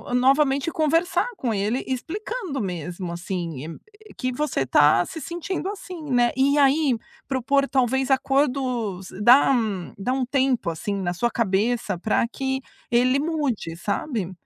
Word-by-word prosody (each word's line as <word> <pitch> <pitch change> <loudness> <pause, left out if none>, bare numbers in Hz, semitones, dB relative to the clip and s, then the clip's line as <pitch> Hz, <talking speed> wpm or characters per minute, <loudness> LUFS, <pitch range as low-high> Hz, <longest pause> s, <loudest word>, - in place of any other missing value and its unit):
novamente 275 +3 +3
conversar 330 +7 +1
com 240 -7 -1
ele 210 +5 -1
explicando 345 - -4
mesmo 175 -1 -4
assim 170 -4 -5 0.3
e - - -13
que 255 -1 -2
você 270 - -1
tá 150 +6 +4
se 320 - -8
sentindo 350 +4 -4
assim, 370 -4 -7
né. 240 -1 +3
E 280 +2 +3
aí 280 -2 +3 0.3
propor 275 +1 +1
talvez 265 +1 +1
acordos 255 -8 0
dá 250 +6 +7
um 215 -8 -1
dá 200 +6 -2
um 260 -1 0
tempo 260 -8 +1
assim 200 +5 -3
na 180 -2 -2
sua 240 +7 0
cabeça 210 -2 0
pra 220 +3 +1
que 265 +2 -3 0.3
ele 255 +3 +3
mude, 285 - -2
sabe. 200 - -2
255 Hz, 140 wpm, -24 LUFS, 200-280 Hz, 0.3 s, dá